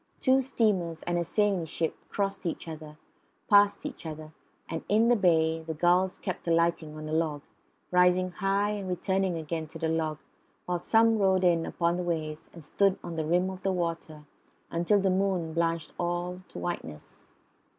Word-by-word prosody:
Two 265 0 +4
steamers 200 -11 0
and 175 0 0
a - - 0
sailing 200 -1 +1
ship 160 0 -2
crossed 195 -2 -2
each 165 - -4
other; 155 -1 -8 0.5
passed 205 -1 +4
each - - -6
other; 155 -1 -8 0.3
and 165 0 -4
in 220 +3 +4
the 245 - +6
bay 165 -5 +2
the 160 0 -5
gulls 180 +3 +2
kept 185 -3 -5
alighting 165 -2 +1
on 155 0 -7
a - - -5
log, 155 -3 0 0.5
rising 180 0 +4
high, 200 +3 0
returning 190 0 -1
again 160 0 -4
to 160 - -10
the 165 0 -1
log, 160 -2 -1 0.5
while 180 -1 -1
some 225 +4 +3
rode 190 -2 +3
in 170 -2 +3
upon 170 0 0
the - - -2
waves 155 -3 -3
and 165 - -12
stood 195 +4 +2
on 170 -1 -6
the 160 -1 -2
rim 180 +3 +2
of 190 0 -9
the 195 - 0
water 165 -4 -3 0.5
until 175 +5 +2
the 195 -1 +2
moon 185 -4 0
blanched 165 -1 -1
all 175 +1 -2
to - - -12
whiteness. 80 - -6
175 Hz, 175 wpm, -28 LUFS, 160-190 Hz, 0.5 s, the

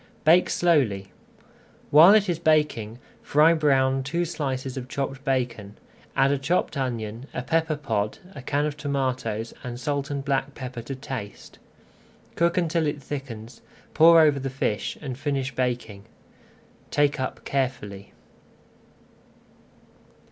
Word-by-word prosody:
Bake 170 +4 +5
slowly. 125 - +1 0.8
While 165 +8 +9
it 210 -1 +3
is 170 -3 -1
baking 150 -9 +1 0.2
fry 155 +3 +4
brown 135 -4 +2
two 170 +6 -1
slices 135 -5 -3
of 130 -2 -6
chopped 135 +1 -4
[Page 130 -3 +1
259] 105 -3 -12
bacon, - - -28 0.4
add 135 +1 +3
a 140 - 0
chopped 155 +6 0
onion, 120 -2 -4
a 125 - -2
pepper 160 +2 0
pod, 110 -8 -2 0.2
a 140 - -8
can 145 +3 0
of 150 -1 -3
tomatoes, 130 -6 -2
and 120 -1 -6
salt 140 0 -2
and 140 -1 -4
black 135 0 -1
pepper 125 -2 -6
to 135 +4 -6
taste. 130 -6 -8 0.8
Cook 170 +1 +1
until 165 -2 +1
it 145 0 -2
thickens, 125 -5 -7 0.3
pour 165 +1 +7
over 150 -3 +4
the 135 0 -3
fish, 125 -5 -2
and 135 -4 -6
finish 135 -3 -2
baking. 120 -5 -3 0.8
Take 145 0 +1
up 130 - -4
carefully. 115 -8 -3
135 Hz, 140 wpm, -25 LUFS, 125-150 Hz, 0.8 s, While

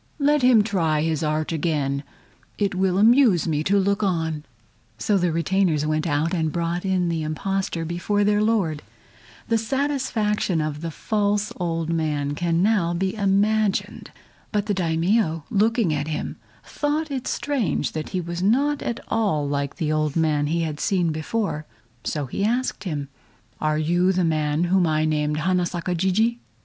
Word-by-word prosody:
Let 295 0 +3
him 250 -4 +6
try 165 -8 +1
his 160 -1 0
art 155 0 -1
again; 145 -4 -1 0.6
it 200 -2 0
will 185 0 +1
amuse 220 - +5
me 150 -1 0
to 200 +2 +3
look 200 +1 +1
on." 160 -6 -1 0.5
So 210 - +1
the 180 -3 +2
retainers 165 -1 +1
went 155 +2 0
out 150 +3 0
and 160 -3 0
brought 170 +1 -2
in 185 -2 +1
the 165 -1 -1
impostor 165 +2 -2
before 180 +5 0
their 205 0 +2
Lord. 200 -9 +1 0.7
The 230 -1 +2
satisfaction 225 - 0
of 155 0 -3
false 205 +3 -1
old 165 -2 -2
man 150 -3 -1
can 170 +2 0
now 190 -5 +2
be 190 +2 -1
imagined. 205 0 +1 0.4
But 210 -2 0
the 210 - 0
Daimio 165 -1 +1
looking 215 -4 +2
at 145 0 -2
him, 155 -1 -4 0.3
thought 300 +1 -2
it 260 -2 -3
strange 265 - -1
that 155 -1 -5
he 185 - -2
was 170 +1 -5
not 280 +9 +2
at 235 - -3
all 195 -10 0
like 140 0 -2
the 155 -3 -1
old 155 -2 0
man 155 -3 +1
he 165 +2 0
had 155 -2 -3
seen 180 -6 +1
before, 155 0 -2 0.4
so 150 -3 -2
he 135 - -3
asked 235 -2 -1
him: 145 -5 -3 0.5
"Are 155 0 +1
you 175 +4 +2
the 185 -2 +1
man 155 0 +1
whom 180 0 +3
I 155 0 +1
named 150 -1 0
Hana 180 +1 +1
Saka 175 +1 -3
Jijii?" 200 +7 +1
175 Hz, 165 wpm, -23 LUFS, 155-205 Hz, 0.7 s, him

